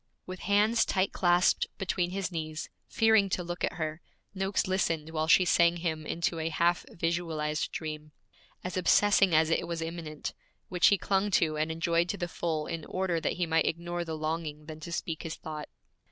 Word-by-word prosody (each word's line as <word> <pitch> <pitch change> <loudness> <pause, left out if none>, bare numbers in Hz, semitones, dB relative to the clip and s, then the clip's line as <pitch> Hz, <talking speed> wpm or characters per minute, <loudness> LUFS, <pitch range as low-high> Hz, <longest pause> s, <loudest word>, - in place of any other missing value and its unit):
With 185 0 -7
hands 210 +4 +3
tight 190 0 0
clasped 175 0 +3
between 185 -3 -1
his 190 0 -3
knees, 155 -2 -5 0.2
fearing 220 -3 +4
to 185 - -1
look 175 +1 -5
at - - 0
her, 155 0 -4 0.3
Noakes 195 0 0
listened 165 -4 0
while 155 -1 -1
she 185 +3 +6
sang 170 0 +4
him 160 -2 -3
into 170 0 -1
a 160 0 -1
half 170 +2 +1
visualized 165 -3 -2
dream, 155 -1 -6 0.5
as 180 0 -4
obsessing 195 -1 +4
as 160 +1 +4
it - - +1
was 170 -1 -3
immanent, 165 -2 -5 0.4
which 180 -1 +4
he 200 - +5
clung 195 +2 +1
to 155 -2 +1
and 155 +1 -1
enjoyed 170 +1 +1
to 200 - -2
the 175 -2 -2
full 160 -3 -2
in 165 -2 -5
order 185 -3 -1
that - - 0
he 180 - -1
might 165 0 +2
ignore 175 +1 -2
the 160 -2 -5
longing 155 -1 -3
then 155 0 -8
to 165 +2 -8
speak 165 -1 -3
his 160 - -5
thought. 155 -1 -7
170 Hz, 190 wpm, -29 LUFS, 160-180 Hz, 0.5 s, she